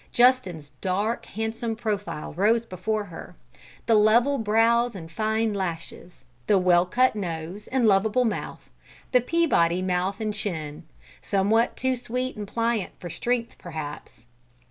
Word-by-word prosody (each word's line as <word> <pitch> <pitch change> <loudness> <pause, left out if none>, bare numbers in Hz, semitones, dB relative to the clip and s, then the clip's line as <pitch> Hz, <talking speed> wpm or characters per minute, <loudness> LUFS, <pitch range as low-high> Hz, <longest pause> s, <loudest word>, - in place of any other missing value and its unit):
Justin's 240 - +2
dark, 205 +5 -1
handsome 225 +1 -3
profile 205 -8 -3
rose 220 +7 +2
before 215 +2 -2
her: 180 -5 -10 0.5
the 230 - +3
level 235 +6 +4
brows 230 +2 +3
and 165 -3 -8
fine 220 +2 0
lashes; 175 -5 -5 0.2
the 205 - +5
well 180 -1 +4
cut 255 +5 +3
nose 175 0 -5
and 255 -2 +1
lovable 215 +4 +3
mouth 220 - -4 0.4
the 250 -1 +5
Peabody 210 - +2
mouth 185 +2 -1
and 215 -1 -2
chin, 160 -7 -4 0.4
somewhat 210 +4 +1
too 260 0 +1
sweet 250 +1 -3
and 210 -1 -6
pliant 230 -1 -1
for 175 - -7
strength, 240 +3 -2
perhaps. 155 -7 -8
210 Hz, 135 wpm, -25 LUFS, 180-235 Hz, 0.5 s, the